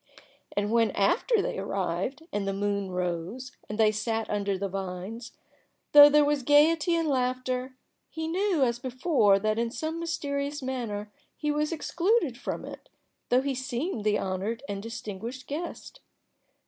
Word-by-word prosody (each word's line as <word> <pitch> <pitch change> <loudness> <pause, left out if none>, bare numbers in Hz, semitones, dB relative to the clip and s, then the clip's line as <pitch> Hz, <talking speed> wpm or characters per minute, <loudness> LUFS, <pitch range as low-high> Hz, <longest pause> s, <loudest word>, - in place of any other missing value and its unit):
And 205 +1 +1
when 230 -1 +4
after 395 - +2
they - - -3
arrived, 195 - -2
and 200 -1 -1
the 195 - 0
moon 200 0 -1
rose, 180 +7 -3 0.2
and 210 - -4
they 220 -1 +5
sat 225 +1 -2
under 200 -2 0
the 200 +1 -2
vines, 195 +5 -6 0.6
though 290 0 +11
there 295 0 +5
was 290 -1 +1
gayety 305 +5 +4
and 330 -1 0
laughter, 255 -1 -1 0.3
he 320 0 -4
knew, 360 -2 +1
as 240 -2 +1
before, 255 - +3
that 215 +2 0
in 235 0 0
some 315 +8 -4
mysterious 285 -3 -3
manner 225 -5 -4 0.3
he 300 -1 -1
was 300 +1 0
excluded 335 - +1
from - - -5
it, - - -10 0.4
though 250 +1 +4
he 280 -1 0
seemed 260 - -3
the 210 -1 +2
honored 195 +6 -3
and 200 -1 -4
distinguished 230 +2 -6
guest. 340 - -6
245 Hz, 155 wpm, -28 LUFS, 205-290 Hz, 0.6 s, though